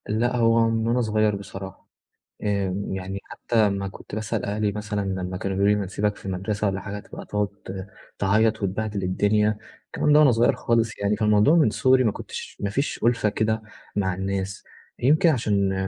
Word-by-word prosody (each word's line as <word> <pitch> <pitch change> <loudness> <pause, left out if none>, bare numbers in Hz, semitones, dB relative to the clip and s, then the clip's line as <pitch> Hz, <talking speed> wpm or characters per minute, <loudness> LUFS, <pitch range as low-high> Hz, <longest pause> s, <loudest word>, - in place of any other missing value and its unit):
لأ 120 +4 +1
هو 115 -1 +4
من 115 0 0
وأنا 120 +2 +2
صغيّر 110 -2 +1
بصراحة، 95 -1 -9 0.6
آآ 100 -3 0
يعني 95 +1 -4
حتّى 110 -3 +1
لمّا 100 0 -2
كنت 100 - -9
بأسأل 110 -2 -2
أهلي 105 0 0
مثلًا 105 0 -3
لمّا 95 -2 -3
كانوا 95 +1 -3
بيقولوا 100 +1 +4
لي 105 - -1
بنسيبك 100 +2 -1
في - - -15
المدرسة 100 +3 -2
والّا 95 -1 -1
حاجة 105 +1 -6
تبقى - - -10
تقعد 105 0 0 0.7
تعيّط 110 +2 +2
وتبهدل 100 +1 -2
الدنيا، 105 +3 +2 0.3
الكلام 150 - +1
ده 150 - +7
وأنا 150 -4 +6
صغيّر 115 +1 +3
خالص 115 -1 0
يعني، 100 +1 +1
فالموضوع 105 +7 +4
من 155 -9 +5
صغري 130 +4 +3
ما 110 - +2
كنتش - - -8
ما 100 - -1
فيش 140 +8 -2
أُلفة 115 -2 +3
كده 110 +1 0 0.3
مع 95 -2 +1
الناس، 95 +1 -3 0.4
يمكن 155 +6 +4
عشان 100 -8 +1
105 Hz, 180 wpm, -24 LUFS, 100-110 Hz, 0.7 s, ده